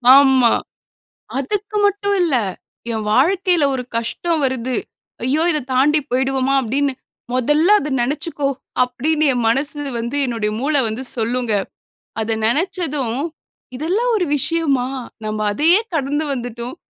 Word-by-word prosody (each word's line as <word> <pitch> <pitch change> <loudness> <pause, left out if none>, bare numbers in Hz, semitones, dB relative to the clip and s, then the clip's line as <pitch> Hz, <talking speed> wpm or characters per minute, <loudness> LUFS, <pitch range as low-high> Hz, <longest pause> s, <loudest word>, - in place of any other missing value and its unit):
ஆமா, 265 -4 +6 0.9
அதுக்கு 410 +9 -2
மட்டும் 405 0 +1
இல்ல, 320 -7 +2 0.6
என் 220 -1 -3
வாழ்க்கையில 355 - +3
ஒரு 250 - -3
கஷ்டம் 310 +8 -1
வருது, 255 -1 -1 0.5
"ஐயோ 285 +6 +2
இத 305 - 0
தாண்டி 295 +4 +4
போயிடுவோமா?" 265 +1 +1
அப்படின்னு 275 +4 0 0.4
"முதல்ல 295 +7 +2
அதை 300 - -4
நினைச்சுக்கோ," 290 +2 -2 0.4
அப்படின்னு 300 +6 0
என் 245 - -1
மனசு 290 +4 -1 0.2
வந்து 235 +5 -3
என்னுடைய 225 -4 -1
மூளை 290 +2 +2
வந்து 220 +4 -4
சொல்லுங்க. 235 0 -1 0.7
அத 220 0 -1
நினைச்சதும், 295 -4 -1 0.6
"இதெல்லாம் 395 - 0
ஒரு 365 -4 0
விஷயமா, 280 -4 0 0.4
நம்ப 215 0 -3
அதையே 325 - +4 0.2
கடந்து 290 +2 -1
வந்துட்டோம். 245 +1 -5
275 Hz, 120 wpm, -19 LUFS, 245-315 Hz, 0.9 s, ஆமா